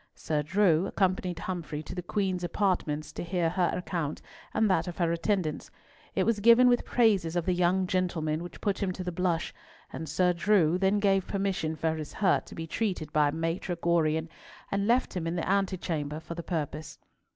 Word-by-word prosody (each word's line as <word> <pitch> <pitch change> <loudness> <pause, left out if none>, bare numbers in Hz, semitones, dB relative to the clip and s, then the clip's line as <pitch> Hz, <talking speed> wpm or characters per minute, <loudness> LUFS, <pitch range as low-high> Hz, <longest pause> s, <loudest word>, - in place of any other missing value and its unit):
Sir 150 -2 -1
Drew 175 +2 +2
accompanied 185 -3 0
Humfrey 165 -5 -4
to - - -8
the 180 - -4
Queen's 185 0 -1
apartments 170 -5 -1
to - - -5
hear 170 -1 0
her 180 0 +1
account 170 -4 -3 0.3
and 220 0 +2
that 185 -4 +1
of 175 - -6
her 170 -2 +1
attendants. 170 -2 -1 0.5
It - - +2
was 230 -2 +1
given 235 +4 +7
with 245 -1 +3
praises 200 -9 +2
of 175 - 0
the 185 - +2
young 180 +1 +2
gentleman 170 -4 -1
which 175 -1 -9
put 200 -3 -1
him 195 -2 0
to 185 - -5
the 180 - -3
blush, 175 -1 -1 0.4
and 160 -2 -5
Sir 180 +3 +2
Drew 175 -2 +3
then 195 +2 +3
gave 195 -2 +2
permission 195 -5 -1
for 160 +1 -1
his 155 -1 -6
hurt 190 -3 +1
to - - -10
be 165 - -5
treated 175 -4 -2
by 150 -1 +4
Maitre 165 +3 -2
Gorion, 165 -2 +1 0.4
and 200 +1 0
left 245 -1 +2
him 170 -2 -2
in 165 - -2
the 170 - -2
antechamber 175 -6 -1
for 160 +1 -7
the 170 - -5
purpose. 155 -3 -4
175 Hz, 195 wpm, -29 LUFS, 160-190 Hz, 0.5 s, given